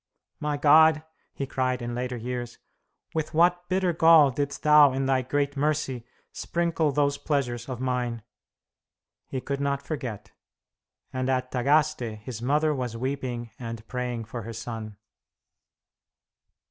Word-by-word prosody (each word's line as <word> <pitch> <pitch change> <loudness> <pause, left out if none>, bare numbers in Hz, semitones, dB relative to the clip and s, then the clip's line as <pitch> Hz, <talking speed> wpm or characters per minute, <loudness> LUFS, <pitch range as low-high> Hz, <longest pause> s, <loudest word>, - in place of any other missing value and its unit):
"My 150 -1 -1
God," 155 +1 +6 0.3
he 140 - -4
cried 130 -1 -1
in 120 -1 -4
later 125 0 -3
years, 120 0 -5 0.6
"with 155 -1 -3
what 175 +1 +3
bitter 185 -1 +1
gall 160 -3 +6
didst 140 +2 -3
Thou 150 -2 +7
in 135 +1 -1
Thy 130 -1 +2
great 140 +2 -1
mercy 140 -4 -1 0.2
sprinkle 170 -3 0
those 140 0 +1
pleasures 125 -5 -2
of 125 -2 -4
mine!" 125 -3 -2 1.0
He 130 - -3
could 140 +1 -3
not 140 0 -1
forget; 125 -9 -5 0.8
and 130 0 -1
at 130 -1 0
Tagaste 135 -3 +1
his 115 -1 -7
mother 150 +5 +2
was 125 -4 -3
weeping 125 -2 -3
and 115 -2 -7
praying 125 -3 -3
for 115 +2 -6
her 115 +2 -7
son. 110 -2 -6
130 Hz, 135 wpm, -26 LUFS, 120-150 Hz, 1.0 s, Thou